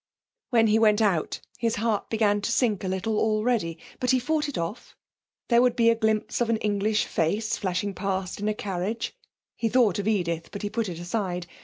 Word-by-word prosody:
When 230 -3 +4
he 220 0 +4
went 215 -1 +4
out 195 -8 +1 0.2
his 230 -1 +1
heart 220 -1 -1
began 210 -2 +2
to 230 - -1
sink 225 -6 +1
a - - -2
little 195 +4 -1
already, 215 -6 +1 0.2
but 250 - -1
he 260 - +5
fought 300 +3 0
it 285 - -5
off; 170 +8 -5 0.5
there 235 -1 +5
would 250 -1 +3
be 230 -1 +5
a - - +2
glimpse 220 0 0
of 235 - +1
an 230 - +2
English 210 0 +1
face 205 +7 0
flashing 195 +1 -2
past 190 -1 -3
in 205 - -2
a 215 - -1
carriage 200 +3 -3 0.4
he 230 - -1
thought 220 -5 +3
of 200 - -2
Edith, 170 -6 0
but 200 - -6
he 205 - -2
put 225 -2 -1
it 170 - -6
aside. 180 0 -3
215 Hz, 205 wpm, -26 LUFS, 190-230 Hz, 0.5 s, he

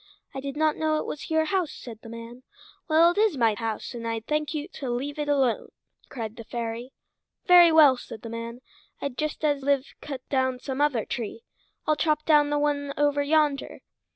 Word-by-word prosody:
"I 270 - -4
did 275 +1 -5
not 310 -1 +2
know 310 -1 +1
it - - -3
was 295 - -6
your 320 0 +2
house," 360 -3 0
said 230 -3 -10
the 225 - -11
man. 230 +2 -9 0.5
"Well, 330 +1 +5
it 350 - -2
is 425 -8 +3
my 230 -3 +3
house, 220 +2 -4
and 230 -1 -5
I'll 225 0 -1
thank 300 +5 -1
you 305 0 -3
to 270 -7 -6
let 275 +5 -3
it 295 0 -2
alone," 270 -5 +1 0.4
cried 225 -3 -5
the 230 - -7
fairy. 235 +2 -5 0.5
"Very 350 -2 +8
well," 300 -5 +7
said 220 - -10
the 230 - -6
man. 230 +1 -6 0.4
"I'd 280 -3 -4
just 305 +1 -2
as 290 -2 +1
lieve 280 0 0
cut 270 -3 -7
down 260 -2 +1
some 265 +2 -4
other 275 -7 +2
tree. 240 - -5 0.4
I'll 305 - +3
chop 305 0 0
down 295 -2 +5
the 295 - +1
one 285 -1 -1
over 290 0 +2
yonder." 295 -1 +1
280 Hz, 205 wpm, -26 LUFS, 240-305 Hz, 0.5 s, Very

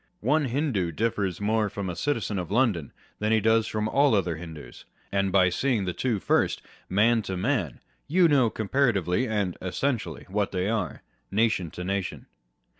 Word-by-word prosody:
One 150 +6 +2
Hindoo 120 - 0
differs 100 0 -1
more 105 0 +1
from 100 -1 -5
a 90 - -3
citizen 110 -8 -1
of 90 - -5
London 105 - +1 0.3
than 105 +1 0
he 110 - +4
does 110 +1 +3
from 110 0 -1
all 140 0 +3
other 90 -4 0
Hindoos; 80 -2 -10 0.3
and 100 -1 +1
by 95 -1 +5
seeing 115 +1 0
the 90 - -2
two 120 -2 -1
first, - - +1 0.3
man 115 +4 +3
to 95 -3 -4
man, 95 - -1 0.3
you 175 +4 +4
know 135 -7 +4
comparatively 110 - +1
and 105 -5 -1
essentially 115 +6 -2
what 100 +1 -1
they 95 0 -1
are, 110 -4 -2 0.3
nation 105 -4 +1
to 90 - -7
nation. 95 +1 -3
105 Hz, 170 wpm, -26 LUFS, 95-115 Hz, 0.3 s, by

